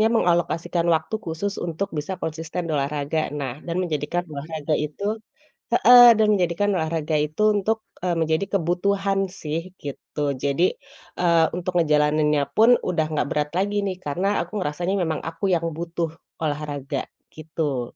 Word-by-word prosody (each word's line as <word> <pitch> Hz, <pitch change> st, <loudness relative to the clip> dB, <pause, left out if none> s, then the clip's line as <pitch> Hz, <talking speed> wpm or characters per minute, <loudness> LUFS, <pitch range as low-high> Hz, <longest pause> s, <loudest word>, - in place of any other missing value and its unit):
harusnya 220 Hz, -, +5 dB
mengalokasikan 175 Hz, -4 st, +1 dB
waktu 160 Hz, +6 st, 0 dB
khusus 185 Hz, +5 st, -3 dB
untuk 175 Hz, +2 st, -3 dB
bisa 160 Hz, +5 st, -4 dB
konsisten 165 Hz, +2 st, -4 dB
olahraga. 150 Hz, +1 st, -1 dB
Nah, 140 Hz, -1 st, -5 dB
dan 170 Hz, +1 st, -2 dB
menjadikan 170 Hz, +1 st, -2 dB
olahraga 155 Hz, +1 st, -3 dB
itu 200 Hz, +10 st, -2 dB, 0.5 s
heeh, 245 Hz, 0 st, +9 dB
dan 215 Hz, -, +4 dB
menjadikan 180 Hz, +2 st, +1 dB
olahraga 160 Hz, -2 st, -1 dB
itu 150 Hz, +7 st, -1 dB
untuk, 220 Hz, +3 st, 0 dB, 0.2 s
eee, 180 Hz, -, +1 dB
menjadi 160 Hz, +4 st, +1 dB
kebutuhan 195 Hz, +3 st, 0 dB
sih, 165 Hz, -3 st, -4 dB, 0.2 s
gitu, 145 Hz, +1 st, -5 dB
jadi, 140 Hz, +7 st, +1 dB, 0.4 s
eee, 170 Hz, -2 st, +4 dB
untuk 180 Hz, +1 st, -3 dB
ngejalaninnya 150 Hz, -1 st, +3 dB
pun 230 Hz, +3 st, +7 dB
udah 160 Hz, -3 st, 0 dB
gak 145 Hz, -, 0 dB
berat 150 Hz, 0 st, 0 dB
lagi 205 Hz, +2 st, 0 dB
nih, 190 Hz, -1 st, -2 dB
karena 185 Hz, +8 st, 0 dB
aku 210 Hz, -, -5 dB
ngerasanya 175 Hz, +4 st, -1 dB
memang 160 Hz, -2 st, -1 dB
aku 165 Hz, +4 st, -4 dB
yang 170 Hz, -, -2 dB
butuh 170 Hz, -1 st, -3 dB, 0.3 s
olahraga, 145 Hz, -2 st, -3 dB, 0.2 s
gitu. 150 Hz, -5 st, -4 dB
165 Hz, 145 wpm, -23 LUFS, 150-185 Hz, 0.5 s, heeh